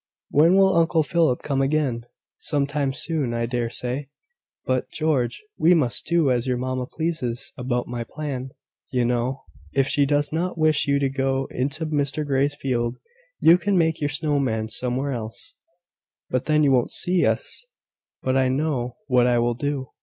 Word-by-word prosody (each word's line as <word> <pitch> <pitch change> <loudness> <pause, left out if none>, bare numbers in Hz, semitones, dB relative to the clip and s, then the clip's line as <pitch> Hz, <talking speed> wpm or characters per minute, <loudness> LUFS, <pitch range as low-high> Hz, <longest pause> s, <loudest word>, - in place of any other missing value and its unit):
When 165 +5 +5
will 195 -1 +5
Uncle 165 -1 +3
Philip 160 -5 +1
come 135 -2 0
again?" 135 -4 0 0.3
"Some 145 -1 0
time 140 -1 -1
soon, 145 -4 -1
I 115 0 0
dare 120 -1 -2
say. 125 +4 -3 0.6
But, 130 -1 -1
George, 155 - -1 0.2
we 175 +3 +5
must 130 -8 0
do 165 -4 +3
as 125 0 0
your 125 -1 0
mamma 130 0 -3
pleases 155 -8 -2
about 125 -1 -2
my 120 -1 -4
plan, 135 0 -5 0.4
you 125 -2 +1
know. 125 +2 -1 0.3
If 135 -1 +2
she 145 -1 +2
does 145 +1 +1
not 175 +2 -1
wish 155 -3 +2
you 140 0 +3
to 140 -1 +1
go 135 0 -1
into 145 +6 -2
Mr 150 0 -1
Grey's 140 +1 +1
field, 120 -4 -2 0.4
you 170 +2 +6
can 195 +1 +1
make 160 -2 +1
your 145 - +1
snow 145 0 0
man 110 -5 -1
somewhere 125 +4 -1
else." 120 - -5 0.8
"But 130 -1 0
then 150 0 +3
you 140 - +4
won't 125 -2 +2
see 180 -1 +2
us. - - -2 0.6
But 130 0 +1
I 130 -1 +3
know 130 -3 -1
what 125 -2 +3
I 120 -1 +3
will 120 0 +2
do. 140 +1 -3
135 Hz, 175 wpm, -23 LUFS, 125-155 Hz, 0.8 s, you